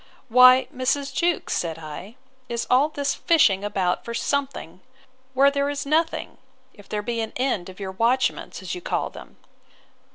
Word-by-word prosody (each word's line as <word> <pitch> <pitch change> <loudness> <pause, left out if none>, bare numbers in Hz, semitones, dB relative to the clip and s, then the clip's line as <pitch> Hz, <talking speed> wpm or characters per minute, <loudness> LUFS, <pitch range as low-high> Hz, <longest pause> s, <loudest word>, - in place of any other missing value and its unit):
Why, 255 +2 +7
Mrs. 275 +2 -1
Jewkes, 345 +3 0
said 165 -2 -2
I, 165 +7 -9 0.3
is 235 -1 -2
all 270 +4 +4
this 285 -2 -2
fishing 220 - +3
about 190 -3 -1
for 235 - -6
something, 270 - -3 0.5
where 275 +2 +5
there 280 0 0
is 285 0 -4
nothing, 320 +3 -1 0.3
if 205 -2 -17
there 210 -1 -3
be 235 0 -2
an 220 - -5
end 250 -9 -1
of 185 - -13
your 190 -1 -5
watchments, 240 +6 0
as - - -4
you 360 - -6
call - - -2
them? - - -13
250 Hz, 165 wpm, -23 LUFS, 205-280 Hz, 0.5 s, Why